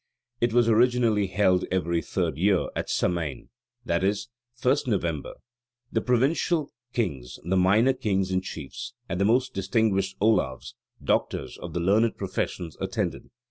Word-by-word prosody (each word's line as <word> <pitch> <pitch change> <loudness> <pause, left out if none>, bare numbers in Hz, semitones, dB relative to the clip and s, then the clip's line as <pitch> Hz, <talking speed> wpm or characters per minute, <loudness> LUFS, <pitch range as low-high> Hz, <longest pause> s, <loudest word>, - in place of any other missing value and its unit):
It 120 0 +2
was 120 0 +4
originally 115 -3 +3
held 95 -1 +2
every 85 -2 0
third - - -2
year, 95 +3 +2
at - - -3
Samain, 80 -6 -1 0.4
i.e., 95 +4 +2 0.5
1st 130 +2 +3
November. 85 - -1 0.6
The - - +1
provincial 140 +5 +1 0.2
kings, 65 - -3
the 90 +3 0
minor 100 +8 +4
kings 95 -6 -1
and 95 0 +1
chiefs, 75 -7 -7
and 90 - -2
the - - +4
most 125 +4 +2
distinguished 95 0 0
ollaves 95 -12 +1 0.3
(doctors) - - 0
of 85 -2 -7
the 90 - -1
learned 105 +6 +2
professions 90 -3 -3
attended. - - -3
95 Hz, 140 wpm, -26 LUFS, 90-115 Hz, 0.6 s, was